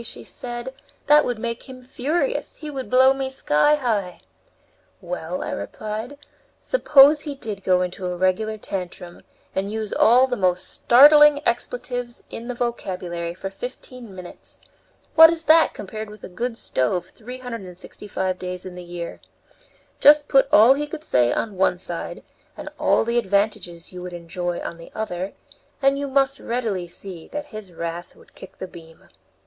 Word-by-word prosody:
she - - -6
said, 240 +1 -6 0.3
"that 300 +1 +6
would 245 -2 -2
make 235 +3 -5
him 255 -1 -10
furious; 310 - -2
he 305 -2 -8
would 265 -2 -6
blow 260 +1 +6
me 270 -1 -3
sky 265 - +3
high." 215 -10 -2 0.8
"Well," 180 -1 -5
I - - -4
replied, 215 +6 -5 0.4
"suppose 295 - +5
he 290 -3 -5
did 215 -7 -5
go 180 -1 +3
into 180 +1 -4
a 180 - -3
regular 215 +4 0
tantrum 180 -3 -6 0.3
and 195 +2 -2
use 220 -1 -4
all 245 +3 +5
the 255 -1 -2
most 180 -3 +1
startling 295 +3 +7
expletives 245 0 -3
in 235 - -7
the 250 - -4
vocabulary 180 -8 -3
for 195 +1 -6
fifteen 245 0 -8
minutes! 180 -1 -10 0.5
What 325 0 +10
is 330 0 -2
that 320 0 +5
compared 215 +2 -7
with 210 0 -13
a - - -7
good 230 +6 -4
stove 175 - -1
365 210 -5 -6
days 180 0 -6
in 185 - -7
the 180 0 -9
year? 175 -1 -7 0.8
Just 295 0 +7
put 270 -1 +4
all 225 +5 +8
he 295 +2 -3
could 305 +1 -7
say 120 - +2
on 210 - -2
one 185 -1 +2
side, 175 -1 -6 0.3
and - - -7
all - - +3
the 235 +1 +2
advantages 200 -5 -1
you 180 - -7
would 180 0 -7
enjoy 175 +1 -4
on 170 - -6
the 165 - -12
other, 190 -3 -4 0.5
and 275 0 +2
you 285 - -2
must 275 0 +1
readily 220 -7 -2
see 175 -1 -9
that 295 0 -5
his 215 -4 -8
wrath 170 +1 -6
would - - -21
kick - - -13
the - - -5
beam." 165 -2 -15
215 Hz, 165 wpm, -23 LUFS, 180-260 Hz, 0.8 s, What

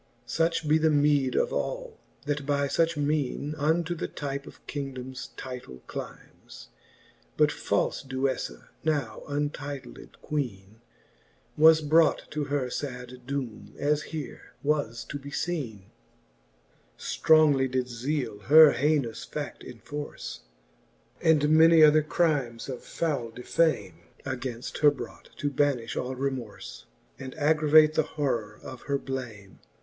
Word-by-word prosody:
Such 165 -1 0
be 155 +1 +4
the 160 0 +3
meede 145 -3 +3
of - - +1
all, - - -3 0.3
that 145 -1 -1
by 140 0 +1
fuch 165 +2 +1
mene 145 0 -1
Unto 160 +3 +1
the 170 - -4
type 140 -1 -5
of - - -14
kingdomes 130 -2 -6
title 125 - -8
clymes. - - -10 0.7
But - - +4
falfe - - -1
DueJJa^ 130 0 -2 0.2
now 145 -7 -1
untitled 145 -1 -5
Queene, 110 -7 -4 0.7
Was 160 +1 +7
brought 155 +2 +4
to 150 -1 -2
her 140 -3 -1
fad 125 -2 -6
doome, 120 -7 -5
as 150 +1 +1
here 155 -4 -7
was 140 -6 0
to 145 - -6
be 140 +1 -9
leene, - - -6
XLIII. 120 - -4 1.1
Strongly 150 -4 +4
did 130 -1 -1
Zele 125 -1 -3
her 155 +1 +9
haynous 145 -5 0
fa£t 150 -1 -5
enforce, 145 +5 -7 0.8
And 155 -2 +4
many 160 0 +7
other 155 0 +7
crimes 145 -7 0
of 130 - -5
foule 140 -8 -2
defame 115 - 0 0.3
Againft 130 -3 -5
her 150 - +7
brought, 130 -5 -8
to 145 -1 -1
banifh 135 -5 0
all 130 +1 -3
remorfe, 130 -5 -5 0.3
And 130 -1 -7
aggravate 155 0 +5
the 155 - +3
horror 120 -9 -2
of 130 -2 -9
her 140 - +2
blame. 120 -8 -7
140 Hz, 130 wpm, -27 LUFS, 125-150 Hz, 1.1 s, her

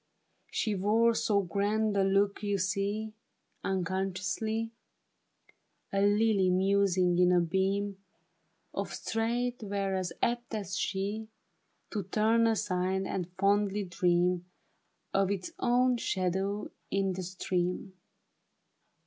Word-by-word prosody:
She 215 - 0
wore 215 +4 +3
so 205 -2 +2
grand 205 +4 0
a 195 - +3
look, 195 +1 +2
you 205 -1 0
see, 200 +3 -1 0.5
Unconsciously; 195 +4 -1 1.2
A 195 - +2
lily 205 -1 +3
musing 185 -1 +3
in 180 0 +5
a 180 - +5
beam 195 +3 0 0.7
Of - - -3
starlight, 240 +2 -1
were 200 -2 -2
as 185 -2 -1
apt 240 -1 0
as 200 -2 -3
she 205 +3 -2 0.6
To 210 - -1
turn 220 +4 +2
aside' 190 -3 0
and 185 -2 -3
fondly 200 +1 +2
dream 180 -1 +1 0.7
Of 195 -1 +3
its 195 -3 -3
own 250 0 +3
shadow 195 0 -1 0.2
in 195 -1 +1
the 185 - -4
stream. 180 +1 -2
195 Hz, 110 wpm, -30 LUFS, 185-215 Hz, 1.2 s, in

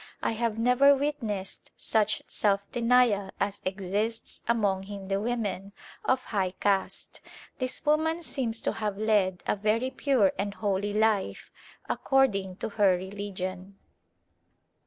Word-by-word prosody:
I - - +1
have 225 -1 -1
never 250 +5 +5
witnessed 235 -9 -3
such 215 -1 +1
self 200 -1 +1
denial 235 -5 +3
as 200 0 -1
exists 200 +4 -2
among 205 -5 +2
Hindu 195 0 -4
women 205 -4 -2 0.3
of 260 0 +1
high 190 -3 -1
caste. 195 -2 -1 0.4
This 255 +2 -2
woman 320 +3 +2
seems 235 -7 -1
to - - 0
have 210 -2 -3
led 205 -4 +1
a - - +1
very 215 +5 0
pure 255 -11 +2
and 200 0 -2
holy 205 -1 -1
life, 215 -2 +1 0.4
according 200 -9 +1
to 205 - -4
her 200 -4 +3
religion. 190 0 -6
210 Hz, 125 wpm, -28 LUFS, 195-235 Hz, 0.4 s, never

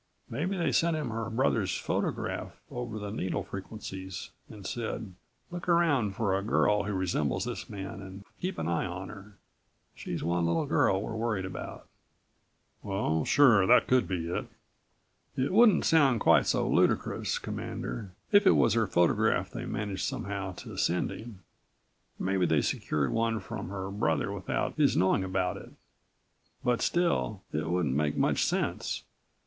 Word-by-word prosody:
Maybe 170 +11 -1
they 170 - +1
sent 165 -1 +2
him 150 -7 -3
her 110 0 -3
brother's 110 -5 +1
photograph - - -3
over 120 -3 -4
the 105 -1 -5
needle 95 -4 -2
frequencies 95 -2 -7 0.2
and 105 -3 -11
said: 110 -4 -4 0.4
'Look 175 +1 -5
around 145 - +3
for 100 -4 +1
a 95 - 0
girl 105 -1 +2
who 105 - -2
resembles 90 -7 0
this - - -5
man 95 -1 -6
and 95 +1 -9 0.2
keep 185 +2 -2
an 80 - -2
eye 85 +1 0
on 90 +1 -6
her. 100 0 -12 0.6
She's - - -5
one 85 0 +1
little 85 0 +1
girl 95 - +2
we're 110 - -5
worried 110 -4 -1
about." 95 - -7 1.0
"Oh, 95 -6 0
sure, 115 -9 +5
that 125 - +6
could 125 -6 +3
be 85 -3 -2
it." 85 - -3 0.9
"It 130 +5 +1
wouldn't 220 -2 +6
sound 140 -7 +4
quite - - +5
so - - +1
ludicrous, - - +1
Commander, 105 -4 -5 0.2
if 205 -1 +6
it - - +7
was 115 - +4
her 115 -2 +2
photograph 85 -1 +2
they - - -5
managed 100 -5 -3
somehow 100 -1 -3
to - - -9
send 90 +1 +1
him. 110 -5 -9 0.7
Maybe 95 -1 +1
they 80 -3 +3
secured 70 -3 -1
one 115 -1 +1
from 95 - -6
her 95 0 -5
brother 80 -7 0
without - - -2
his - - +3
knowing 95 +1 +3
about 95 -1 -1
it. - - -11 0.9
But 125 -1 +1
still 170 - +1
it 80 +2 -1
wouldn't 85 -6 +1
make 75 +1 0
much - - +2
sense. - - -1
100 Hz, 160 wpm, -29 LUFS, 95-115 Hz, 1.0 s, it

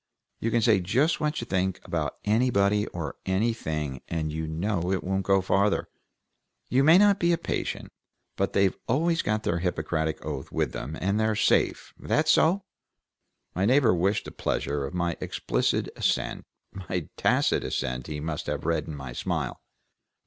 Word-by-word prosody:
You 115 - -1
can 115 0 +1
say 110 -3 +5
just 125 - +1
what 150 0 -1
you - - -4
think 95 -2 -1
about - - -2
anybody 105 -2 +2
or 80 -5 -5
anything, 80 - -1
and 80 -2 -2
you 80 0 -3
know 90 +2 -1
it 95 - 0
won't 95 +1 0
go 95 -1 +4
farther. 100 +2 +1 0.8
You 130 +2 +3
may 160 +4 +7
not 200 0 +5
be 170 0 +3
a - - +2
patient, 170 - -3 0.4
but - - -1
they've 100 -1 +3
always 165 +6 +2
got 110 0 -1
their 85 - 0
Hippocratic 80 -3 -2
oath - - -5
with - - 0
them, 75 +6 -5
and 100 +3 0
they're 110 0 +2
safe. 105 - +1
That 155 +1 +1
so?" 170 +5 +4 0.9
My 95 +3 0
neighbor 125 -1 +4
wished 95 +4 +1
the - - -7
pleasure 70 -1 -2
of 90 - -8
my 85 -1 -1
explicit - - -1
assent; - - -1 0.3
my 90 -3 -4
tacit - - +2
assent 60 0 -3
he 75 -1 -4
must 75 0 -4
have - - -3
read 80 -2 0
in 80 - -5
my 65 -3 -7
smile. - - -3
95 Hz, 170 wpm, -27 LUFS, 80-115 Hz, 0.9 s, may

